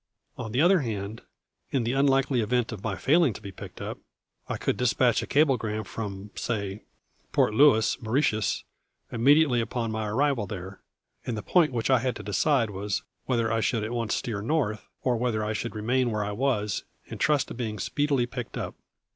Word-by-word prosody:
On 110 - -6
the 125 - +2
other 180 +2 +5
hand, 110 -4 -4 0.5
in 135 -4 0
the 120 +2 0
unlikely 135 -2 +3
event 120 +2 0
of 105 -3 -7
my 105 -4 -1
failing 150 - +3
to 105 - -10
be 100 -2 -7
picked - - -10
up, - - -5 0.5
I - - -1
could - - 0
dispatch 125 -1 +2
a - - -5
cablegram 120 -8 +2
from, 100 -1 -6
say, 100 -3 -3 0.5
Port 105 - +3
Louis, 115 -1 +4
Mauritius, 110 -3 +1 0.5
immediately 135 +1 +4
upon 115 -1 -2
my 110 -1 -2
arrival 125 -1 +1
there; 95 0 -7 0.4
and 115 - -3
the 105 - -5
point 170 -5 +3
which 120 +1 0
I 130 - +5
had 125 +1 -1
to 105 - -7
decide 110 - +2
was 100 0 -2 0.2
whether 115 -3 +1
I 115 - +2
should 110 +1 0
at 110 - -3
once 115 -2 -1
steer 110 -4 -3
north, 115 -4 -1 0.2
or 125 -2 +2
whether 115 -3 0
I 105 - -1
should 110 +3 -4
remain 120 +4 +1
where 105 -2 -1
I 105 - -3
was, 105 -3 0 0.2
and - - -8
trust 150 -3 +2
to - - -5
being 115 -3 -4
speedily 145 -2 +1
picked 120 -1 -6
up. - - -4
115 Hz, 190 wpm, -27 LUFS, 105-130 Hz, 0.5 s, other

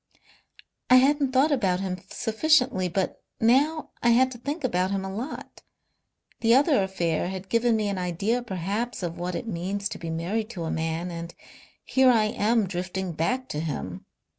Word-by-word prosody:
"I 255 - +8
hadn't 275 +1 +4
thought 270 +4 +3
about 195 -10 +1
him 185 -1 -3
sufficiently. 250 -4 +2
But 190 +2 -2 0.2
now 285 +7 +2
I 240 - +3
had 255 +2 +4
to 240 - -9
think 290 +5 -4
about 185 -6 +1
him 195 -1 -2
a 190 - -5
lot. 245 +9 -7 0.8
The 230 +1 +4
other 280 -2 +4
affair 175 -4 -1
had 190 +1 -6
given 230 0 +3
me 215 -1 0
an 200 -2 -2
idea 195 +7 -1
perhaps 205 +2 -3
of 170 -1 -4
what 175 0 -3
it 235 - -4
means 200 0 -2
to - - -7
be 165 0 -5
married 190 +7 -2
to 170 - -3
a 160 - -2
man. 165 +2 -2
And 170 0 -7 0.5
here 265 -1 +4
I 230 -3 +5
am 215 +1 +1
drifting 185 0 -3
back 250 +12 -1
to 150 - -3
him. 125 - -5
200 Hz, 180 wpm, -26 LUFS, 180-245 Hz, 0.8 s, I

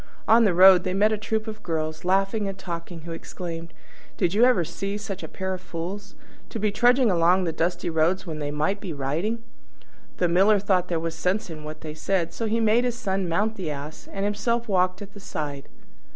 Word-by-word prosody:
On 230 +1 +6
the 195 - +3
road 185 0 +8
they 185 -1 -2
met 210 +2 +4
a - - +2
troop 215 0 -2
of 215 -1 -7
girls, 155 -3 -3
laughing 195 +3 +1
and 195 -1 -5
talking, 170 -2 -6
who 170 +1 -8
exclaimed, 165 0 -6 0.5
"Did 175 - +1
you 220 +4 +4
ever 210 -10 +3
see 200 +5 -4
such 205 -3 -6
a - - -6
pair 190 -1 -4
of 185 - -6
fools? 180 +4 -6 0.3
To - - -5
be 210 -1 0
trudging 245 +2 +4
along 175 +2 +4
the 170 - 0
dusty 175 +2 -1
road 165 +3 +2
when 160 -5 -6
they 145 -1 -3
might 155 +7 -1
be 185 -5 -5
riding!" 165 +12 -2 0.7
The 180 - +2
Miller 195 +5 +4
thought 190 -3 +1
there 170 -2 -1
was 165 0 -3
sense 185 +4 -1
in 155 -1 -8
what 155 0 -8
they 155 -1 -6
said; 170 +1 -1
so 225 - -2
he 225 +2 +1
made 225 +2 +3
his 245 -1 -1
Son 190 -5 -1
mount 215 +6 0
the 180 -5 -3
Ass, 150 +1 -7
and 195 0 -2
himself 235 +3 -1
walked 185 -1 +1
at 200 0 -13
the 205 - -11
side. 145 -6 -5
185 Hz, 220 wpm, -25 LUFS, 165-210 Hz, 0.7 s, road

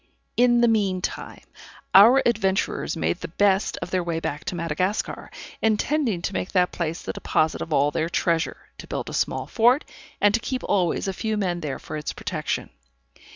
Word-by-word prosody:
In 240 -1 +4
the 240 - +5
mean 200 -5 +2
time, - - -5 0.5
our 230 +8 +8
adventurers 195 -6 0
made 175 - -1
the - - -4
best 195 +3 +1
of 175 - -8
their 185 -1 +1
way 170 -1 -2
back 150 -2 -4
to - - -3
Madagascar, 175 +4 -2 0.3
intending 220 - +1
to 195 - -2
make 185 - -3
that 180 -2 +3
place 165 -1 -3
the - - -4
deposit 155 0 0
of 165 - -5
all 145 0 +3
their 165 +1 -1
treasure, 165 -1 -1
to - - -9
build - - -4
a - - -8
small - - -1
fort, 245 +5 +3 0.3
and 205 0 +4
to 230 - +3
keep 255 +2 -4
always 185 -2 0
a 195 - -1
few 220 +2 -2
men 180 -4 -1
there 150 -5 -4
for 155 - -7
its 150 - -4
protection. - - -3
190 Hz, 190 wpm, -24 LUFS, 170-220 Hz, 0.5 s, our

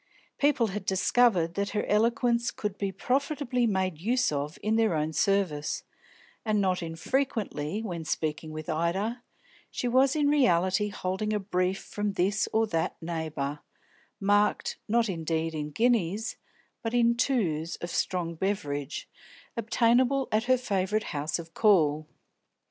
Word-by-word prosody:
People 285 -5 +3
had 210 -1 -4
discovered 190 -2 +3
that 200 +2 -1
her - - 0
eloquence 235 +2 +2
could 210 -2 -4
be 200 -1 -1
profitably 250 - 0
made 185 -6 -1
use 245 +3 +2
of 145 +2 -3
in 215 +1 +1
their 225 -6 +3
own 155 +1 -1
service, 160 -3 0 0.6
and 215 -2 +1
not 185 -2 +1
infrequently, 195 - -2
when 175 -6 -4
speaking 155 0 -2
with 155 0 -7
Ida, 190 +9 -1 0.5
she 245 - -3
was 260 +3 +4
in 295 -2 +2
reality 210 - +3
holding 200 +2 -2
a 210 - +1
brief 185 -1 0
from 205 -1 -3
this 195 +3 +1
or 225 0 +3
that 165 -5 -2
neighbour, 155 -4 -3 0.6
marked, 205 +1 +2
not 230 +1 +2
indeed 165 -3 -2
in 150 -1 -3
guineas, 220 +1 +1 0.5
but 225 +1 -2
in 235 -1 +4
"twos" 180 - 0
of 175 - -6
strong 175 -2 -1
beverage, 150 -6 -3 0.5
obtainable 240 +4 +2
at 215 +2 +1
her 255 +1 +4
favourite 210 -2 0
house 150 +1 -1
of 165 -1 -9
call. 155 -8 +3
195 Hz, 140 wpm, -28 LUFS, 165-230 Hz, 0.6 s, was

